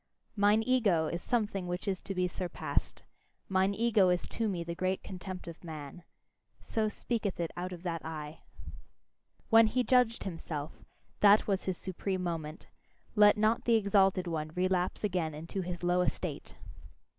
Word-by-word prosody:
"Mine 205 +1 +4
ego 215 -11 +3
is 170 +2 -3
something 210 -6 -1
which 180 +2 -4
is 190 -2 -1
to 195 - -5
be 180 0 +1
surpassed: 180 0 -3 0.4
mine 190 +1 +2
ego 215 -4 +3
is 180 0 +1
to 225 -2 -1
me 175 -4 -2
the 170 0 -4
great 185 +2 -1
contempt 185 -1 -7
of 170 +1 -9
man": 155 0 -8 0.6
so 220 -1 -1
speaketh 210 -3 -3
it 170 -1 -2
out 180 +1 -4
of 175 -1 -8
that 165 -3 -3
eye. 155 -1 -6 1.1
When 225 0 +8
he 250 +3 +1
judged 250 -3 +3
himself 160 -5 -6 0.4
that 205 +1 +6
was 195 -2 -1
his 185 -2 -2
supreme 185 0 -3
moment; 160 -3 -4 0.5
let 210 0 +6
not 215 +2 +2
the 235 - +4
exalted 195 -3 +3
one 155 -3 -3
relapse 185 +1 0
again 175 -6 -1
into 165 +5 -4
his 175 -1 -5
low 175 +1 +3
estate! - - -3
185 Hz, 160 wpm, -31 LUFS, 170-210 Hz, 1.1 s, When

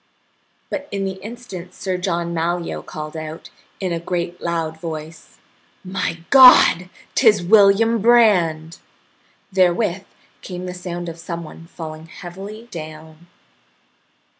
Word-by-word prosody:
But 285 0 -4
in 195 -1 -3
the 190 0 -5
instant 205 -5 -9
Sir 190 -2 -3
John 170 -2 -2
Malyoe 170 +1 -2
called 155 0 -7
out, 155 +1 -7 0.3
in 185 -3 -2
a 165 - -2
great 175 0 -4
loud 165 -2 -2
voice: 160 -1 -8 0.5
"My 185 -3 -3
God! 250 -9 +8 0.2
'Tis 215 -7 +4
William 215 +3 +5
Brand!" 185 -9 +3 0.7
Therewith 185 +1 +1 0.4
came 180 -1 -7
the 180 - -5
sound 175 -1 -6
of 165 0 -7
some 170 0 -5
one 165 +1 -12
falling 160 -1 -9
heavily 200 +5 -9
down. 155 0 -10
175 Hz, 120 wpm, -20 LUFS, 165-195 Hz, 0.7 s, God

